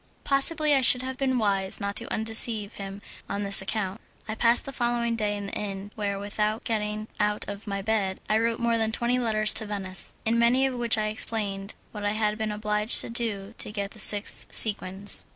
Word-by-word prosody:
Possibly 300 +2 +3
I 270 - +4
should 250 0 +5
have 260 0 -4
been 260 -2 +1
wise 195 -4 0
not 200 0 -3
to - - -4
undeceive 220 -1 +2
him 195 +1 -8 0.3
on 205 - -3
this 200 -1 +6
account. 195 0 -3 0.3
I 220 - -3
passed 230 +2 +2
the 275 - -6
following 240 -1 0
day 210 -2 -1
in 200 - -6
the 200 - -7
inn, 200 0 -5
where, 200 -2 -3
without 210 +2 -2
getting 215 -1 -2
out 210 0 0
of 205 +1 -8
my 200 -1 -3
bed, 200 -3 -1
I 215 - +2
wrote 230 0 0
more 235 -1 +1
than 220 0 0
twenty 240 +2 0
letters 215 -3 +1
to 220 - +2
Venice, 190 -3 -3
in 230 +1 +2
many 245 +3 +3
of 265 - -1
which 235 -2 0
I 215 0 0
explained 205 -2 -2 0.2
what 210 -2 -7
I 205 0 0
had 215 0 -1
been 215 -1 -2
obliged 210 +1 +1
to - - -5
do 220 -3 -3
to - - -2
get 200 -1 -4
the 220 - -7
six 205 0 +3
sequins. 200 -2 +3
215 Hz, 210 wpm, -26 LUFS, 205-230 Hz, 0.3 s, this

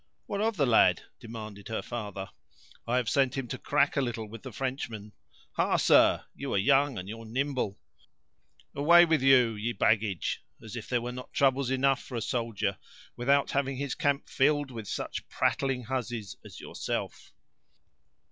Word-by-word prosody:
"What 200 - -3
of 220 -1 0
the 145 - +3
lad?" 120 -3 +4 0.2
demanded 110 -3 -8
her 110 - -3
father; 100 -5 -6 0.6
"I 120 +2 +1
have 125 -3 0
sent 135 +2 +2
him 135 -2 -3
to 130 - -4
crack 145 0 +2
a 140 - +2
little 115 -3 -3
with 110 +1 -10
the 130 - -8
Frenchman. 115 -5 -4 0.4
Ha, - - +2
sir, - - +5
you 140 0 -5
are - - +3
young, 135 +4 +3
and 90 - -6
you're 115 +2 -7
nimble! 130 -4 -2 1.0
Away 170 +5 +6
with 160 -4 +2
you, 130 -4 +5
ye 110 +3 -3
baggage; 105 -3 0 0.2
as 110 -1 -9
if 115 - -7
there 125 -2 +1
were 120 - -3
not 125 +1 -9
troubles 135 -1 +2
enough 135 +1 +2
for 130 - -9
a 115 - -2
soldier, 110 -5 -2 0.4
without 140 +3 +2
having 135 -1 0
his 140 -1 -2
camp 145 -3 0
filled 145 0 +1
with 110 -4 -7
such - - -5
prattling 135 -2 0
hussies 120 -4 -4
as - - -11
yourself!" - - -5
125 Hz, 170 wpm, -29 LUFS, 110-140 Hz, 1.0 s, Away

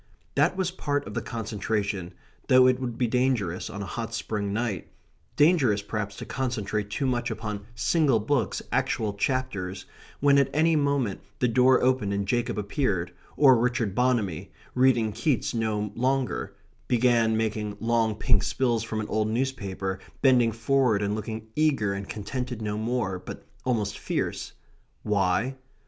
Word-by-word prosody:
That 155 +6 +2
was 185 -2 0
part 145 -5 -2
of 105 - -7
the 115 - -2
concentration, 105 -5 -3 0.3
though 130 0 +7
it 130 0 +4
would 120 -3 -4
be 125 - +2
dangerous 120 -7 0
on 100 +1 -5
a - - -5
hot 115 +2 -4
spring 105 -2 -2
night 110 -1 -2 0.5
dangerous, 140 - +4
perhaps, 105 -1 -4
to - - -7
concentrate 110 -6 -2
too 120 +7 -2
much 120 -2 0
upon 105 -2 -5
single 130 +2 +2
books, 135 +6 0
actual 105 -2 0
chapters, 100 -5 -2 0.3
when 140 0 +5
at 140 - +2
any 160 +1 +4
moment 140 -8 0 0.2
the 125 -3 +2
door 125 +2 +4
opened 125 -6 +2
and 100 0 -1
Jacob 120 +1 0
appeared; 100 -4 -1 0.3
or 135 -3 +7
Richard 115 -3 0
Bonamy, 110 -8 0 0.2
reading 125 -4 +3
Keats 130 +1 0
no 105 -3 -1
longer, 125 -5 -1 0.3
began 115 -2 +3
making 110 -2 -2
long 115 -1 +1
pink 110 -2 +2
spills 120 -4 0
from 110 -1 -3
an 105 - -5
old 110 0 0
newspaper, 100 -6 -2 0.2
bending 125 -4 +5
forward, 115 -2 +2
and 100 0 0
looking 110 +1 -4
eager 140 -10 +2
and 100 0 -6
contented 125 +3 -4
no 105 -1 -2
more, 110 -4 -1
but - - -9 0.2
almost 110 -5 -1
fierce. - - -3 0.5
Why? 105 +6 +1
115 Hz, 155 wpm, -26 LUFS, 105-130 Hz, 0.5 s, though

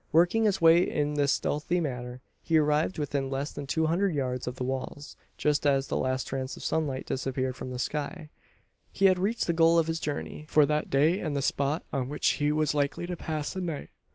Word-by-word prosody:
Working 175 +7 +4
his 200 -3 +2
way 165 +1 +7
in 150 -4 0
this 145 -1 +2
stealthy 150 +4 -1
manner, 125 -5 -4 0.2
he 165 -1 +2
arrived 150 +3 +2
within 145 -2 -2
less 135 +2 -3
than 145 -1 -7
two 160 +3 +1
hundred 175 +2 +1
yards 125 -3 -2
of 125 - -3
the 130 - -4
walls 135 +3 -5 0.2
just 150 -1 +1
as 135 -1 +3
the - - -1
last 130 0 0
trace 130 0 -4
of - - -10
sunlight 145 -5 -1
disappeared 130 -1 -2
from 130 - -7
the 125 - -5
sky. 150 +4 -4 0.6
He 195 - +1
had 185 -1 +5
reached 215 +5 0
the 170 - +1
goal 165 0 +5
of 165 - +4
his 165 0 -2
journey 150 0 -5
for 150 -1 +5
that 150 +1 -1
day 155 +7 +3
and 155 -4 -3
the - - 0
spot 140 +4 0
on 130 -2 -1
which 150 - +1
he 145 0 +3
was 155 0 +1
likely 145 +3 -1
to 180 0 -4
pass 155 -3 -4
the 190 - -4
night. 165 -5 -4
150 Hz, 220 wpm, -28 LUFS, 135-165 Hz, 0.6 s, way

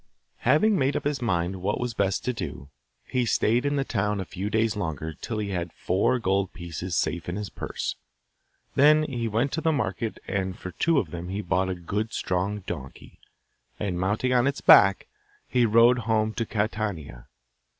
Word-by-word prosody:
Having 205 +5 +3
made 135 +1 +1
up - - -1
his 145 -2 -1
mind 90 -4 -1
what 100 +3 -1
was 125 -1 -2
best 100 -3 0
to 125 - 0
do, 80 - -6 0.4
he 125 - 0
stayed 120 +3 +2
in 145 - 0
the 140 - +1
town 105 -4 -1
a 95 - -3
few 95 +3 -4
days 110 0 +1
longer 80 -5 -3
till 110 +7 -5
he 105 -1 -2
had 90 -3 -3
four 95 +7 +1
gold 95 -4 0
pieces 85 0 -5
safe 80 +2 -1
in 90 - -3
his 105 -1 -5
purse. - - -4 0.8
Then 150 +2 +5
he 120 -6 -2
went 115 +6 0
to 160 - -2
the 160 - +2
market 110 - -2
and 95 -1 -2
for 90 - -7
two 165 - +1
of - - 0
them 85 0 -6
he 100 +2 -3
bought 95 +1 0
a 95 - -2
good 105 +6 -3
strong 95 +3 -1
donkey, 70 -7 -8 0.6
and, 95 -4 -2
mounting 105 +7 0
on 125 +1 +3
its 140 - -1
back, 100 -1 +6 0.4
he 120 -2 +3
rode 115 +3 +5
home 110 -1 0
to 115 -1 -2
Catania. 105 - -3
105 Hz, 190 wpm, -26 LUFS, 90-120 Hz, 0.8 s, back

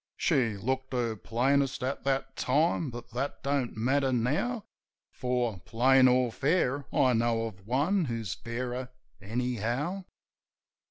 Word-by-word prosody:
She 120 -10 +1
looked 130 +5 -2
her 120 -3 0
plainest 130 +5 +1
at 130 +2 -2
that 135 -1 -1
time; 155 +3 +1
but 120 -1 -9
that 130 +4 -3
don't 140 -5 -1
matter 135 +4 +2
now; 150 - 0 0.5
For, 125 -5 -1
plain 130 +6 +4
or 125 -1 +3
fair, 140 0 +1
I 130 -2 +3
know 115 0 +1
of 95 -3 -9
one 155 - +2
who's 115 - -3
fairer, 125 +5 -4 0.3
anyhow. 125 - -2
125 Hz, 125 wpm, -29 LUFS, 115-140 Hz, 0.5 s, plain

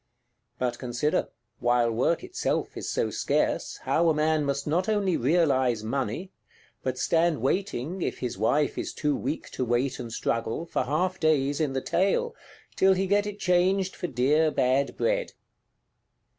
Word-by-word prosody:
But 125 -1 -2
consider, 125 +4 -1 0.3
while 120 -1 +2
work 130 +9 +1
itself - - -2
is - - -5
so - - 0
scarce, - - 0
how 170 +1 +2
a 160 - +2
man 155 0 +2
must 140 0 -1
not 175 +7 0
only 200 -5 +1
realise 130 -5 +2
money; 135 - -3 0.5
but 130 -1 -2
stand 165 +1 +2
waiting 175 - -1
(if - - -2
his 125 -2 -3
wife 130 +9 +1
is - - -4
too 150 -2 0
weak 145 +5 -4
to - - -2
wait 125 +2 0
and 120 -2 -6
struggle) 115 +6 -2
for 150 - -1
half 180 +7 0
days 145 -2 +2
in 145 -4 0
the 135 - -1
Tail, 335 - +1 0.4
till 190 0 +5
he 190 +1 0
get 205 +2 +2
it 205 -1 -5
changed 185 0 +2
for 180 - -4
dear 150 +4 +2
bad 135 -1 +1
bread! - - 0
150 Hz, 160 wpm, -27 LUFS, 125-180 Hz, 0.5 s, till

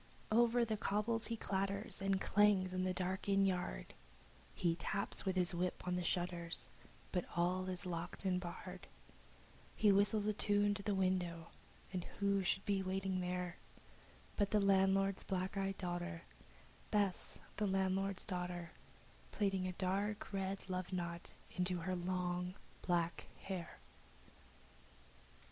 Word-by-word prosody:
Over 235 +1 +5
the 220 -1 -1
cobbles 215 +3 0
he 230 - -2
clatters 195 -1 -1
and 195 -1 +2
clangs 195 -2 +4
in 185 0 0
the 185 - +1
dark 185 +2 -2
inn 195 0 +5
yard, 180 - -1 0.6
He 170 -2 +2
taps 200 +2 -1
with 190 -1 +1
his 180 -1 +3
whip 180 +1 -1
on 180 - +1
the 180 - 0
shutters, 175 -1 -1 0.4
but 180 -2 +1
all 180 +2 +1
is 185 +1 +1
locked 175 +2 -4
and 180 -1 +2
barred, 175 -2 -7 0.9
He 210 - +5
whistles 205 +1 +4
a 215 - +2
tune 205 0 +3
to 205 - -4
the 200 0 0
window, 180 -3 0 0.4
and 180 -2 -1
who 200 -1 +2
should 190 +1 0
be 200 -1 +2
waiting 190 0 -1
there 180 -1 -2 0.8
But 205 -2 +3
the 210 - +4
landlord's 195 0 +3
black 190 +1 -2
eyed 195 0 -1
daughter 175 -1 -3 0.7
Bess, 205 -4 +1 0.2
the 210 - +1
landlord's 195 0 +1
daughter 180 -3 -3 0.6
Plaiting 195 -3 +1
a 185 - -3
dark 200 +3 -1
red 195 0 -2
love 185 -1 -3
knot 170 -2 -4 0.2
into 180 0 +1
her 185 +2 -2
long 180 0 -1 0.3
black 170 -2 0 0.2
hair. 185 -4 -4
185 Hz, 140 wpm, -38 LUFS, 180-200 Hz, 0.9 s, Over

